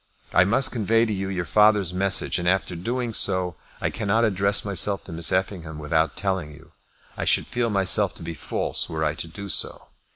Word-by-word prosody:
I 90 - +5
must 120 +7 +3
convey 115 0 +1
to 110 - -2
you 95 -1 -3
your 90 -2 -3
father's 105 +2 +3
message, 95 0 +1
and 90 - -3
after 95 -1 0
doing 120 +6 -3
so 90 -4 +2 0.2
I - - -2
cannot 110 +1 0
address 100 -1 +1
myself 100 -1 +2
to - - -11
Miss 80 0 +1
Effingham 90 -4 -2
without 80 +1 0
telling 95 -4 -2
you. - - -18 0.4
I - - -4
should - - +2
feel 120 -1 -2
myself 100 -3 +2
to - - -10
be 85 - -5
false 80 - -1
were 80 -1 -2
I 75 - 0
to 80 - -7
do 100 +5 -9
so. 85 - -1
95 Hz, 200 wpm, -24 LUFS, 85-105 Hz, 0.4 s, I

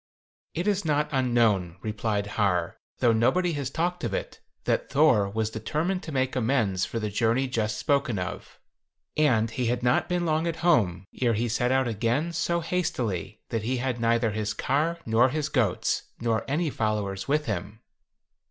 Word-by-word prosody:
"It 175 +5 -1
is 205 -1 +1
not 150 -1 +1
unknown," 115 - +2
replied 105 -1 -1
Har, 100 -5 0 0.2
"though 120 -2 +5
nobody 170 +11 +2
has 140 -3 -2
talked 175 +4 -2
of - - -1
it, - - -5 0.2
that - - 0
Thor 110 -10 +4
was 110 +1 -1
determined 155 - -2
to 160 - -7
make 130 -2 0
amends 110 -7 +1
for - - -5
the 105 -1 -3
journey 115 +5 +1
just 110 -4 -1
spoken 140 -6 +1
of, 90 -1 -6 0.6
and 120 -7 +3
he 125 0 -1
had 120 +1 -1
not 125 +7 +2
been 175 -1 0
long 160 +1 +1
at 165 - -1
home 100 - +3 0.2
ere 120 -3 +3
he 115 +3 0
set 125 +2 0
out 130 -1 +2
again 120 +9 0
so 170 +1 0
hastily 120 - -2
that 115 -2 -1
he 125 +4 -1
had 125 -1 -2
neither 115 -1 +2
his 105 0 -2
car 155 +6 0
nor 115 +3 +4
his 150 +2 -2
goats, 115 -11 +1 0.2
nor 115 -3 0
any 155 +2 0
followers 105 -4 -2
with 150 +2 +1
him. 105 +1 -4
120 Hz, 175 wpm, -27 LUFS, 110-150 Hz, 0.6 s, though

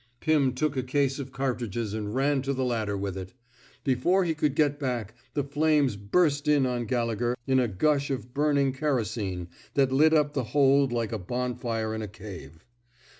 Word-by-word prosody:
'* 120 - -42
Pim 150 -5 +2
took 140 +2 -1
a 130 - 0
case 135 +1 0
of 135 -1 -6
cartridges 120 -5 -2
and 105 0 -4
ran 140 +1 +2
to 135 +1 -1
the 130 -1 -1
ladder 110 -5 -1
with 100 -1 -3
it. 95 -1 -7 0.5
Before 150 +9 +2
he 165 - +1
could 150 -2 0
get 145 -1 +2
back, 120 -6 -3 0.2
the 145 - +1
flames 145 -3 +2
burst 145 - +1
in 145 -3 +4
on 125 -2 -1
Gallegher 120 +1 -1
in 130 -1 +3
a 125 - +2
gush 140 +8 +1
of 125 -2 -4
burning 140 -2 +2
kerosene 110 - -2 0.3
that 135 -2 +3
lit 155 +4 +5
up 150 -1 +2
the 135 - -1
hold 140 -1 +5
like 115 -2 -1
a 110 - -2
bonfire 120 +1 -2
in 110 - -3
a 105 - -4
cave. 90 -7 -11
130 Hz, 190 wpm, -27 LUFS, 110-145 Hz, 0.5 s, lit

